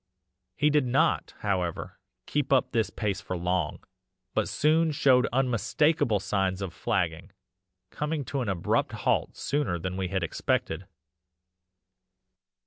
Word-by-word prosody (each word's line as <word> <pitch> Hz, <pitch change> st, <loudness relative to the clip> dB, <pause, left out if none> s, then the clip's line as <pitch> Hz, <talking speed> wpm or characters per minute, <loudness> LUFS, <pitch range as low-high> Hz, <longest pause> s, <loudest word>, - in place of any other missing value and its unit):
"He 150 Hz, +1 st, +3 dB
did 145 Hz, -3 st, +3 dB
not, 125 Hz, +3 st, +1 dB
however, 90 Hz, -5 st, -2 dB, 0.3 s
keep 145 Hz, -2 st, -1 dB
up 135 Hz, -2 st, +3 dB
this 115 Hz, -3 st, +1 dB
pace 100 Hz, -3 st, -2 dB
for 90 Hz, -, -4 dB
long, 90 Hz, -2 st, -1 dB, 0.5 s
but -, -, 0 dB
soon 160 Hz, +1 st, +3 dB
showed 130 Hz, -4 st, +4 dB
unmistakable 130 Hz, 0 st, +2 dB
signs 95 Hz, -1 st, -1 dB
of 90 Hz, -3 st, -5 dB
flagging, 90 Hz, -6 st, -1 dB, 0.6 s
coming 150 Hz, -1 st, -2 dB
to 140 Hz, +1 st, -2 dB
an 115 Hz, -, -2 dB
abrupt 90 Hz, -4 st, 0 dB
halt -, -, 0 dB
sooner 140 Hz, -11 st, -1 dB
than 90 Hz, +2 st, -4 dB
we 95 Hz, -1 st, -1 dB
had 95 Hz, 0 st, -1 dB
expected. 80 Hz, +2 st, -1 dB
105 Hz, 130 wpm, -28 LUFS, 90-140 Hz, 0.6 s, showed